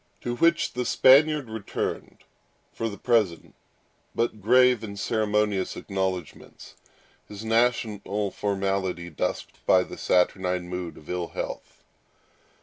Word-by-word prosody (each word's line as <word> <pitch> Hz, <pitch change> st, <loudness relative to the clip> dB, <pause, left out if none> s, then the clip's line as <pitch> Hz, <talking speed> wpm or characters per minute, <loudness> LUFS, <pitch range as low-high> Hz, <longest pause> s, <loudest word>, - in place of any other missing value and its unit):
To 120 Hz, 0 st, -3 dB
which 170 Hz, +5 st, +2 dB
the 125 Hz, -, -2 dB
Spaniard 140 Hz, +3 st, +5 dB
returned 110 Hz, -2 st, -5 dB, 0.5 s
for 115 Hz, -, -2 dB
the 100 Hz, -, -8 dB
present 110 Hz, -9 st, 0 dB, 0.6 s
but 115 Hz, -2 st, -1 dB
grave 125 Hz, +2 st, +4 dB
and 100 Hz, -2 st, -7 dB
ceremonious 105 Hz, -3 st, 0 dB
acknowledgments, 95 Hz, -5 st, -5 dB, 0.5 s
his 105 Hz, +1 st, -9 dB
national 110 Hz, -3 st, 0 dB
formality 95 Hz, -3 st, -2 dB
dusked 75 Hz, -, -4 dB
by 90 Hz, -1 st, +5 dB
the -, -, -10 dB
saturnine 90 Hz, 0 st, +1 dB
mood 90 Hz, -2 st, -5 dB
of 75 Hz, -, -15 dB
ill 90 Hz, -1 st, -3 dB
health. -, -, -7 dB
105 Hz, 115 wpm, -26 LUFS, 95-115 Hz, 0.6 s, Spaniard